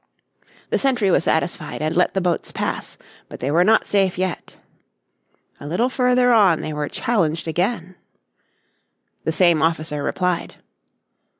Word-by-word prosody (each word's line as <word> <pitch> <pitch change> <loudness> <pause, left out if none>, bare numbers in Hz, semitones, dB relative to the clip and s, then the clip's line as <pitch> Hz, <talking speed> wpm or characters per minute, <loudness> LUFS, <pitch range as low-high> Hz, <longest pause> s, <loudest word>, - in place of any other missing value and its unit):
The - - +2
sentry 245 -8 +1
was 165 - +2
satisfied 160 -1 -1
and 155 +2 -2
let 180 +2 +2
the 190 - +1
boats 175 -2 -1
pass. - - -4 0.3
But - - -10
they 135 +3 -2
were 170 +4 +4
not 220 +4 +3
safe 195 -3 +1
yet. 185 -1 -4 1.0
A 145 - -9
little 190 - 0
further 250 -1 +3
on 195 -8 +4
they 155 - -5
were 150 -1 -3
challenged 170 -10 -1
again. 180 +2 -2 1.3
The - - +1
same 170 -2 +3
officer 155 -2 -1
replied. 180 +3 -2
180 Hz, 140 wpm, -21 LUFS, 160-205 Hz, 1.3 s, were